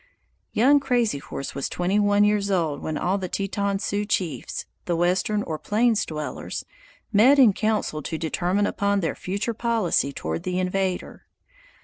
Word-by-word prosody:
Young 275 Hz, +6 st, +5 dB
Crazy 245 Hz, -, +1 dB
Horse 140 Hz, -, -6 dB
was 140 Hz, -, -3 dB
twenty 185 Hz, +4 st, 0 dB
one 205 Hz, 0 st, +4 dB
years 205 Hz, -1 st, +2 dB
old 165 Hz, -7 st, 0 dB
when 155 Hz, -1 st, -3 dB
all 185 Hz, +5 st, 0 dB
the 185 Hz, -2 st, -4 dB
Teton 200 Hz, +1 st, -1 dB
Sioux 205 Hz, 0 st, -1 dB
chiefs 175 Hz, -, -2 dB, 0.2 s
(the 175 Hz, -, 0 dB
western 185 Hz, +5 st, +1 dB
or 155 Hz, -1 st, -4 dB
plains 220 Hz, 0 st, +1 dB
dwellers) 150 Hz, -4 st, -5 dB, 0.5 s
met 250 Hz, +8 st, +6 dB
in 245 Hz, -7 st, +7 dB
council 215 Hz, -8 st, -1 dB
to 160 Hz, +2 st, -4 dB
determine 175 Hz, +5 st, 0 dB
upon 200 Hz, -1 st, 0 dB
their 165 Hz, -, -1 dB
future 200 Hz, +5 st, -3 dB
policy 220 Hz, -, +1 dB
toward 80 Hz, -, -4 dB
the 180 Hz, 0 st, -2 dB
invader. 185 Hz, 0 st, -2 dB
195 Hz, 155 wpm, -24 LUFS, 170-210 Hz, 0.5 s, in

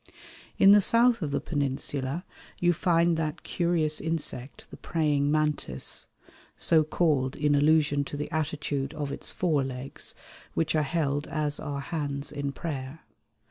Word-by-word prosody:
In 195 Hz, -, +7 dB
the 205 Hz, 0 st, +7 dB
south 230 Hz, +2 st, +5 dB
of 155 Hz, -, -1 dB
the 140 Hz, 0 st, 0 dB
Peninsula 140 Hz, +1 st, -2 dB, 0.3 s
you 175 Hz, 0 st, +3 dB
find 170 Hz, 0 st, +2 dB
that 155 Hz, -2 st, -3 dB
curious 170 Hz, -3 st, 0 dB
insect 155 Hz, -5 st, -3 dB
the -, -, -9 dB
Praying 145 Hz, -3 st, 0 dB
Mantis, 150 Hz, -, -1 dB, 0.5 s
so 160 Hz, -2 st, +4 dB
called 150 Hz, -5 st, +1 dB
in 150 Hz, 0 st, +1 dB
allusion 145 Hz, 0 st, +3 dB
to 145 Hz, -, -6 dB
the 150 Hz, -, -4 dB
attitude 150 Hz, -2 st, -2 dB
of 145 Hz, -2 st, -3 dB
its -, -, -4 dB
forelegs, 135 Hz, -6 st, -1 dB, 0.4 s
which 165 Hz, 0 st, +1 dB
are 155 Hz, -, +3 dB
held 145 Hz, -1 st, -1 dB
as 150 Hz, -2 st, -2 dB
are 145 Hz, -2 st, -4 dB
hands 140 Hz, -2 st, -3 dB
in 140 Hz, -1 st, -3 dB
prayer. 140 Hz, -1 st, -6 dB
150 Hz, 140 wpm, -27 LUFS, 140-160 Hz, 0.5 s, In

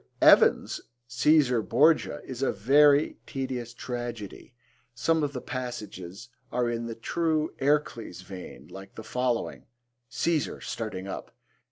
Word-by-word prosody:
Mr. -, -, +4 dB
Evans's -, -, +4 dB, 0.3 s
Caesar 125 Hz, -1 st, +4 dB
Borgia 150 Hz, +9 st, +3 dB
is 130 Hz, -1 st, -7 dB
a 135 Hz, -, +2 dB
very 140 Hz, +7 st, +4 dB
tedious 130 Hz, -4 st, -4 dB
tragedy. 120 Hz, -2 st, -6 dB, 0.4 s
Some 160 Hz, +5 st, +2 dB
of 145 Hz, -1 st, 0 dB
the 125 Hz, -, -4 dB
passages 110 Hz, -4 st, -6 dB, 0.2 s
are 125 Hz, 0 st, +1 dB
in 120 Hz, 0 st, -2 dB
the 115 Hz, -, -5 dB
true 155 Hz, +6 st, 0 dB
'Ercles' 135 Hz, -10 st, 0 dB
vein,' 90 Hz, -1 st, -10 dB
like 95 Hz, 0 st, -11 dB
the 110 Hz, -, -8 dB
following: 125 Hz, 0 st, -2 dB, 0.4 s
CAESAR 150 Hz, +5 st, 0 dB
(starting 100 Hz, -4 st, -5 dB
up). -, -, -7 dB
125 Hz, 130 wpm, -27 LUFS, 115-140 Hz, 0.4 s, Mr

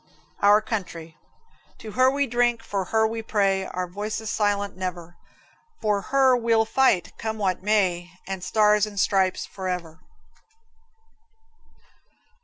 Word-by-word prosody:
Our 205 Hz, +1 st, +6 dB
Country. 170 Hz, -7 st, -5 dB, 0.6 s
To 215 Hz, -, -9 dB
her 255 Hz, +3 st, +4 dB
we 280 Hz, +1 st, 0 dB
drink, 240 Hz, -2 st, 0 dB
for 200 Hz, -4 st, -3 dB
her 220 Hz, +4 st, +2 dB
we 225 Hz, +1 st, -2 dB
pray, 195 Hz, -3 st, 0 dB
Our 185 Hz, -1 st, -4 dB
voices 210 Hz, +4 st, -5 dB
silent 205 Hz, -2 st, 0 dB
never; 175 Hz, -2 st, -6 dB, 0.6 s
For 210 Hz, -2 st, 0 dB
her 265 Hz, -1 st, +4 dB
we'll 230 Hz, -2 st, +2 dB
fight, 220 Hz, -7 st, +2 dB
come 220 Hz, 0 st, -3 dB
what 190 Hz, -4 st, -1 dB
may; 185 Hz, -4 st, +1 dB, 0.2 s
The 190 Hz, -1 st, -5 dB
Stars 210 Hz, +2 st, +3 dB
and 205 Hz, -2 st, -6 dB
Stripes 190 Hz, -2 st, +1 dB
forever. 180 Hz, -4 st, -5 dB
205 Hz, 125 wpm, -24 LUFS, 185-220 Hz, 0.6 s, Our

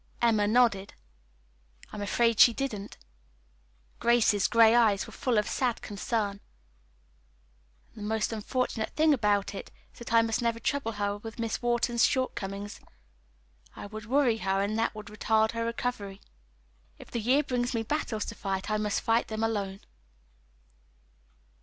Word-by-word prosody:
Emma 220 Hz, -3 st, +3 dB
nodded. 215 Hz, -4 st, +2 dB, 1.0 s
"I -, -, -9 dB
am -, -, -5 dB
afraid 230 Hz, +3 st, +1 dB
she 235 Hz, -, +8 dB
didn't." 220 Hz, -7 st, -4 dB, 1.0 s
Grace's 230 Hz, -4 st, +3 dB
gray 230 Hz, -1 st, +6 dB
eyes 220 Hz, -5 st, +3 dB
were -, -, -12 dB
full 250 Hz, -4 st, 0 dB
of 210 Hz, -, +1 dB
sad 245 Hz, -3 st, -1 dB
concern. 205 Hz, 0 st, -2 dB, 1.5 s
"And -, -, -23 dB
the -, -, -3 dB
most 220 Hz, 0 st, 0 dB
unfortunate 225 Hz, 0 st, -2 dB
thing 310 Hz, 0 st, +4 dB
about 205 Hz, -5 st, +1 dB
it 195 Hz, -, -7 dB, 0.2 s
is -, -, -18 dB
that 235 Hz, -, -8 dB
I 230 Hz, 0 st, +5 dB
must 225 Hz, 0 st, -1 dB
never 230 Hz, -1 st, 0 dB
trouble 230 Hz, -1 st, -1 dB
her 205 Hz, -1 st, -2 dB
with 220 Hz, +1 st, -9 dB
Miss 230 Hz, -2 st, -3 dB
Wharton's 240 Hz, -1 st, +1 dB
shortcomings. 205 Hz, -6 st, -1 dB, 1.0 s
It 205 Hz, -, -8 dB
would 215 Hz, -1 st, -8 dB
worry 255 Hz, -3 st, +3 dB
her, 195 Hz, -2 st, 0 dB
and 205 Hz, +2 st, -1 dB
that 225 Hz, -1 st, 0 dB
would 215 Hz, -1 st, -8 dB
retard 220 Hz, +1 st, +2 dB
her 230 Hz, 0 st, -3 dB
recovery. 230 Hz, -4 st, -3 dB, 0.8 s
If -, -, -14 dB
the 235 Hz, -, -2 dB
year 260 Hz, +7 st, +3 dB
brings 245 Hz, -2 st, -1 dB
me 225 Hz, -, 0 dB
battles 225 Hz, -5 st, -2 dB
to -, -, -6 dB
fight, 195 Hz, +2 st, -3 dB
I 215 Hz, -, +2 dB
must 210 Hz, -1 st, -1 dB
fight 230 Hz, 0 st, +1 dB
them 220 Hz, 0 st, -3 dB
alone." 200 Hz, -3 st, -2 dB
225 Hz, 155 wpm, -28 LUFS, 205-240 Hz, 1.5 s, she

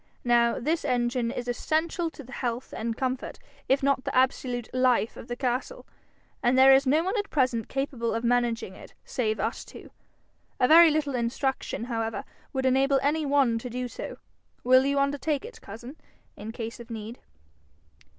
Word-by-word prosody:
Now 235 Hz, -1 st, +3 dB
this 315 Hz, +6 st, -1 dB
engine 245 Hz, -3 st, 0 dB
is 245 Hz, 0 st, -5 dB
essential 320 Hz, +7 st, -1 dB
to 295 Hz, -, -11 dB
the 255 Hz, -, -14 dB
health 245 Hz, -2 st, -4 dB
and 230 Hz, +1 st, -3 dB
comfort, 260 Hz, 0 st, -3 dB, 0.3 s
if 275 Hz, +1 st, +3 dB
not 275 Hz, 0 st, +3 dB
to 260 Hz, -, -17 dB
the -, -, -3 dB
absolute 255 Hz, -2 st, +1 dB
life 255 Hz, -3 st, +2 dB
of -, -, -10 dB
the 240 Hz, -, -4 dB
castle, 255 Hz, -, -3 dB, 0.6 s
and 250 Hz, 0 st, +2 dB
there 265 Hz, +1 st, +8 dB
is 270 Hz, +1 st, +4 dB
no 305 Hz, +5 st, +3 dB
one 380 Hz, +5 st, -1 dB
at 410 Hz, -, -4 dB
present 255 Hz, -6 st, 0 dB
capable 255 Hz, -5 st, -2 dB
of 230 Hz, -, -2 dB
managing 235 Hz, -4 st, 0 dB
it -, -, -14 dB
save 220 Hz, -4 st, -1 dB
us 225 Hz, +4 st, -2 dB
two. -, -, -13 dB, 0.7 s
A 250 Hz, -, +4 dB
very 330 Hz, +2 st, +8 dB
little 300 Hz, -2 st, 0 dB
instruction, 250 Hz, +1 st, -2 dB
however, 225 Hz, +1 st, -3 dB, 0.3 s
would 265 Hz, -1 st, -2 dB
enable 270 Hz, +1 st, +3 dB
any 300 Hz, +1 st, +1 dB
one 270 Hz, -5 st, +3 dB
to 250 Hz, -, -7 dB
do 250 Hz, +1 st, -3 dB
so: -, -, -7 dB, 0.5 s
will 255 Hz, +1 st, +5 dB
you 280 Hz, 0 st, +1 dB
undertake 285 Hz, +2 st, 0 dB
it, 475 Hz, -, -11 dB
cousin, 235 Hz, +7 st, -10 dB, 0.4 s
in 215 Hz, +2 st, -7 dB
case 230 Hz, 0 st, -6 dB
of 235 Hz, 0 st, -11 dB
need?' 225 Hz, +1 st, -7 dB
255 Hz, 180 wpm, -27 LUFS, 235-275 Hz, 0.7 s, there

